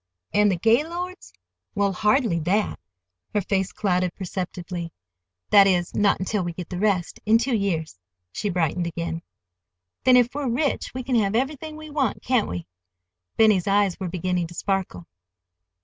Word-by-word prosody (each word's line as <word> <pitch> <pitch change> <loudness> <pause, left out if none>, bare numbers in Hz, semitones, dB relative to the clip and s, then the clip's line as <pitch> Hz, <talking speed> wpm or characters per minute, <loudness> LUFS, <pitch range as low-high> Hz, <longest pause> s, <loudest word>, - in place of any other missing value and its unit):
"An' 210 0 +4
the 190 - +2
Gaylords?" 330 - 0 0.4
"Well—hardly 205 0 +2
that"—her 90 - -3
face 190 0 -1
clouded 180 -3 0
perceptibly—"that 170 - -1
is, 175 -3 +1
not 205 -1 +2
until 195 +2 -1
we 175 -1 -3
get 175 0 -7
the 180 - -4
rest—in 205 +2 +2
two 240 +1 0
years." 165 - -2 0.3
She 205 - -3
brightened 175 -1 0
again. 170 0 -4 0.8
"Then, 255 -1 +6
if 245 0 +3
we're 285 -2 -2
rich 275 +4 -1
we 255 - -3
can 250 -1 +1
have 205 -1 +1
everything 295 +5 -2
we 310 -1 -10
want, 275 -7 -1
can't 250 -4 +2
we?" 90 -1 -5 0.7
Benny's 210 -5 +4
eyes 200 -1 +2
were 185 -2 -3
beginning 180 0 -1
to 170 - -12
sparkle. 185 - -2
195 Hz, 145 wpm, -24 LUFS, 170-225 Hz, 0.8 s, Then